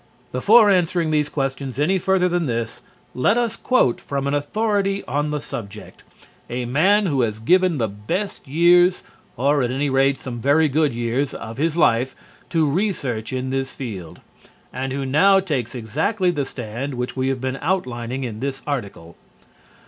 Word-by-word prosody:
Before 210 - +5
answering 175 -3 +1
these 150 -1 +1
questions 135 -3 -3
any 180 +7 +2
further 190 0 +2
than 175 -3 0
this, 115 -1 -3 0.3
let 200 - +2
us 235 -3 0
quote 250 - +1
from 140 -1 -3
an 140 - 0
authority 200 +6 0
on 145 +4 -1
the 150 0 -2
subject, 105 -6 -8 0.5
a 125 0 -3
man 190 - +3
who 140 -7 +1
has 110 -3 -1
given 180 +8 +3
the 115 -4 0
best 105 - -4
years, 175 +5 +4 0.3
or 140 +3 +2
at 125 - 0
any 135 +2 -1
rate 135 +1 +3
some 120 -2 -7
very 145 +5 +4
good 150 0 +1
years, 120 +4 -2
of 115 +1 -7
his 160 +3 0
life 125 -4 +2 0.3
to 160 -3 +2
research 140 - -1
in 130 0 -3
this 135 0 -3
field, 100 -11 -7 0.5
and 130 +1 -3
who 135 0 -3
now 195 +9 +5
takes 135 - -3
exactly 160 - 0
the 145 -5 -2
stand 125 +3 -5
which 125 0 -4
we 130 0 -1
have 135 -1 -1
been 130 +1 -3
outlining 130 -7 -2
in 110 -4 -5
this 135 +1 -4
article. 100 - -5
140 Hz, 170 wpm, -21 LUFS, 125-170 Hz, 0.5 s, Before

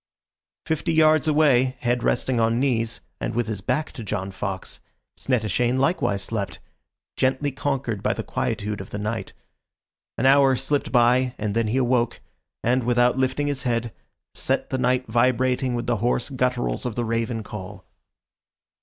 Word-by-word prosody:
Fifty 160 +2 -1
yards 155 -1 +4
away, 135 -4 +3
head 120 0 +1
resting 125 +1 +1
on 115 +1 +2
knees, 115 -4 0 0.2
and - - -3
with 120 0 +1
his 105 -3 -4
back 130 +9 -1
to 120 - -8
John 100 -1 -3
Fox, 95 0 -5 0.4
Snettishane 120 0 0
likewise 130 - +1
slept, 100 -2 -3 0.6
gently 130 +2 +1
conquered 130 -6 -2
by - - +1
the - - -4
quietude 105 0 -2
of 95 - -10
the - - -5
night. 105 +2 -4 0.8
An 125 - 0
hour 135 0 +6
slipped 135 +3 -1
by 125 +1 +3
and 105 -1 -2
then 115 -1 +1
he 115 +5 0
awoke, 125 -2 +1 0.4
and, 125 +2 +2
without 120 +1 +3
lifting 130 +2 0
his 145 -2 -1
head, 120 -3 -1 0.4
set - - -1
the 130 - -1
night 125 0 +1
vibrating 125 +2 +1
with 120 0 -3
the 120 -2 +1
hoarse 120 +4 0
gutturals 125 -1 -1
of 115 - -5
the 120 - -1
raven 115 0 -1
call. 100 -2 -8
125 Hz, 160 wpm, -24 LUFS, 115-130 Hz, 0.8 s, hour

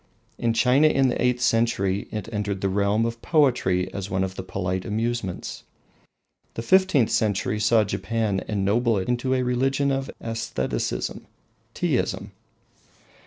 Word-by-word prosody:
In 115 -1 +1
China, 130 +6 +4
in 135 -3 +3
the - - -2
eighth 125 0 +1
century, 115 -5 +1
it 105 -2 -4
entered 100 -2 -2
the 95 - +1
realm 100 +3 +1
of 115 0 -4
poetry 120 - +2
as 100 -1 -5
one 95 0 0
of 95 -1 -3
the 95 - -6
polite 95 0 -3
amusements. 110 -3 -3 0.9
The 115 - -4
fifteenth 185 - +3
century 105 0 0
saw 110 +1 +4
Japan 100 0 -1
ennoble 105 +3 +1
it 95 - -2
into 125 +2 0
a 130 - +1
religion 135 +3 +1
of 135 0 -2
aestheticism 115 0 -3 0.5
Teaism. - - -1
115 Hz, 140 wpm, -24 LUFS, 100-125 Hz, 0.9 s, China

